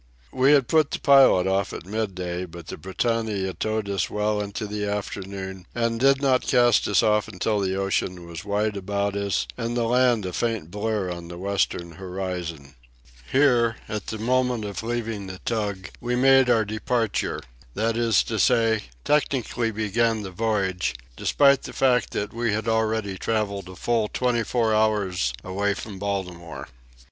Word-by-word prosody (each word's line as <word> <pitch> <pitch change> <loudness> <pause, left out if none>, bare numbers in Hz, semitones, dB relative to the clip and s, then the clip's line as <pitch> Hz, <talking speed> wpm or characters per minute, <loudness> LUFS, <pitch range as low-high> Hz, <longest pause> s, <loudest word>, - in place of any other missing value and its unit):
We 130 +3 +4
had 135 -4 +4
put 155 -3 +3
the - - -2
pilot 135 -10 +6
off 95 +1 0
at - - -7
midday, 90 -4 -3
but 85 -1 -11
the - - -7
Britannia 100 +1 -1
towed 110 +1 -2
us 100 -2 -1
well 105 0 0
into 105 +2 -4
the 105 0 -4
afternoon 95 -2 -5
and 115 -1 0
did 135 +2 +4
not 130 -2 +3
cast 120 -3 +4
us 100 - +3
off 105 0 +2
until 105 +1 -1
the 95 -1 0
ocean 95 -2 -1
was 85 -1 -8
wide 105 +1 0
about 100 +1 -2
us 100 -1 0
and 120 +1 -2
the 120 - +1
land 120 -2 +3
a 90 - -4
faint 110 -8 -2
blur 105 -2 -1
on 85 -1 -7
the 85 0 -8
western 90 -2 -1
horizon. 90 -6 -5 0.6
Here, 120 -5 +4
at 105 -2 -5
the 110 - -4
moment 125 0 +1
of 100 -2 -4
leaving 115 -3 -3
the 95 0 -7
tug, 100 -5 -2
we 125 +1 -1
made 135 0 +5
our 115 -3 +4
"departure"—that 110 - -2
is 115 -3 +3
to 110 -2 -3
say, 115 -1 +3 0.2
technically 130 -5 +1
began 110 +1 0
the 95 - -6
voyage, 95 - -1 0.2
despite 140 - +4
the - - -8
fact 125 -4 +2
that 105 - -3
we 115 -1 0
had 110 +1 -2
already 110 -3 0
travelled 100 -4 -2
a 95 - -10
full 115 +2 0
twenty 125 +1 0
four 115 -1 +1
hours 105 - +1
away 100 +2 -1
from 100 -2 -7
Baltimore. 90 -4 -4
105 Hz, 165 wpm, -24 LUFS, 95-115 Hz, 0.6 s, pilot